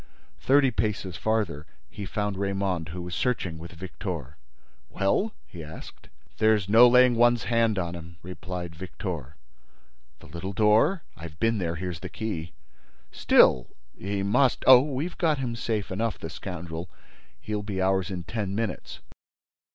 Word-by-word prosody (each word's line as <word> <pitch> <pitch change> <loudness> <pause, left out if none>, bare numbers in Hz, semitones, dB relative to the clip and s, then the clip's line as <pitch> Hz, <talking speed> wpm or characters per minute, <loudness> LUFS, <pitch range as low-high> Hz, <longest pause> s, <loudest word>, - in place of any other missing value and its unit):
Thirty 135 -1 +4
paces 105 -5 -2
farther, 105 -9 -1 0.2
he 100 +8 -7
found 105 -1 -2
Raymonde, 95 -4 -2
who 90 +2 -6
was 90 0 -7
searching 90 -10 -1
with 85 +1 -9
Victor. 85 - -6 0.5
"Well?" 195 - 0
he 85 -3 -10
asked. 80 +1 -11 0.3
"There's 110 -3 +3
no 115 +4 +8
laying 125 0 +6
one's 120 -1 +3
hands 115 +1 +2
on 85 -2 -2
him," 85 0 -10
replied 90 -1 -6
Victor. 85 - -6 0.8
"The - - -16
little 85 +6 -6
door?" 110 - +3
"I've 80 0 -10
been 115 -1 +1
there; 85 -2 -2
here's 90 -1 -5
the 90 - -7
key." 85 -5 -5 0.6
"Still—he 65 +11 +2
must—" 125 +6 +2
"Oh, 130 -1 +9
we've 145 +5 -4
got 160 -4 +2
him 125 -3 -3
safe 110 -4 -2
enough, 110 +2 -1
the 80 - -7
scoundrel—He'll 90 +4 -7
be 100 -2 -4
ours 95 0 +1
in 90 -2 -5
ten 100 +2 -3
minutes." 110 -4 -4
95 Hz, 145 wpm, -26 LUFS, 85-115 Hz, 0.8 s, Oh